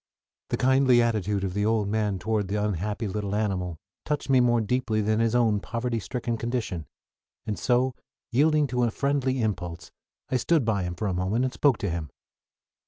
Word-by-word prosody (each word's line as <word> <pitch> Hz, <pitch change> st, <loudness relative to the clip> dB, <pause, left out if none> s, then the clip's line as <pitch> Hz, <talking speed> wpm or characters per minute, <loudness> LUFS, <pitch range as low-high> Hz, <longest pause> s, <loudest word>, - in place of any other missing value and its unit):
The -, -, 0 dB
kindly 130 Hz, -1 st, +4 dB
attitude 105 Hz, -4 st, +1 dB
of 95 Hz, -2 st, -2 dB
the 105 Hz, +1 st, 0 dB
old 110 Hz, -1 st, +1 dB
man 105 Hz, -2 st, 0 dB
toward 105 Hz, +1 st, -1 dB
the 100 Hz, -, -2 dB
unhappy 105 Hz, +1 st, -1 dB
little 100 Hz, 0 st, -3 dB
animal 95 Hz, -5 st, -1 dB, 0.3 s
touched 150 Hz, -2 st, -2 dB
me 130 Hz, -, +6 dB
more 120 Hz, -1 st, +4 dB
deeply 115 Hz, 0 st, 0 dB
than 110 Hz, +1 st, +1 dB
his 115 Hz, +1 st, +2 dB
own 115 Hz, -4 st, +3 dB
poverty 115 Hz, +2 st, -2 dB
stricken 120 Hz, +1 st, -3 dB
condition, 115 Hz, -, -3 dB, 0.6 s
and 105 Hz, -, -3 dB
so, 125 Hz, +1 st, +2 dB, 0.4 s
yielding 150 Hz, +4 st, +3 dB
to 125 Hz, -2 st, -1 dB
a 120 Hz, -, +3 dB
friendly 135 Hz, 0 st, 0 dB
impulse, 90 Hz, -5 st, -3 dB, 0.4 s
I 130 Hz, -, +2 dB
stood 150 Hz, +1 st, +2 dB
by 105 Hz, -4 st, +1 dB
him 90 Hz, 0 st, -4 dB
for 100 Hz, -, -4 dB
a 95 Hz, -, 0 dB
moment 95 Hz, +8 st, 0 dB
and 130 Hz, -, -2 dB
spoke 140 Hz, -6 st, +3 dB
to 100 Hz, -, -2 dB
him. 80 Hz, -3 st, -4 dB
110 Hz, 185 wpm, -26 LUFS, 100-125 Hz, 0.6 s, me